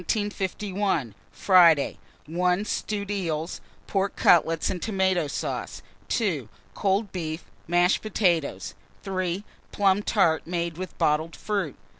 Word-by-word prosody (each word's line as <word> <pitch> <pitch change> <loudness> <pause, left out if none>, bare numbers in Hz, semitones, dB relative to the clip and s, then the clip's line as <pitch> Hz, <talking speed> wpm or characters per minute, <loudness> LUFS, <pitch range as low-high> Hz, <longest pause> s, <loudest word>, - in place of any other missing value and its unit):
Friday. 170 -6 +5 0.3
1. 180 +5 0
Stewed 205 -1 -3
eels, 165 -4 -3 0.2
pork 195 0 -1
cutlets 165 -1 +4
and 180 - -4
tomato 190 -6 +1
sauce. 140 - -4 0.2
2. 160 - -1 0.2
Cold 200 +1 0
beef, 160 -2 -4 0.2
mashed 175 +2 +3
potatoes. 180 -8 0 0.3
3. 185 -1 -2 0.3
Plum 200 0 +3
tart 170 -8 +2
made 170 -1 -2
with 185 -2 -6
bottled 155 +2 +1
fruit. 200 -9 -2
180 Hz, 105 wpm, -26 LUFS, 165-195 Hz, 0.3 s, Friday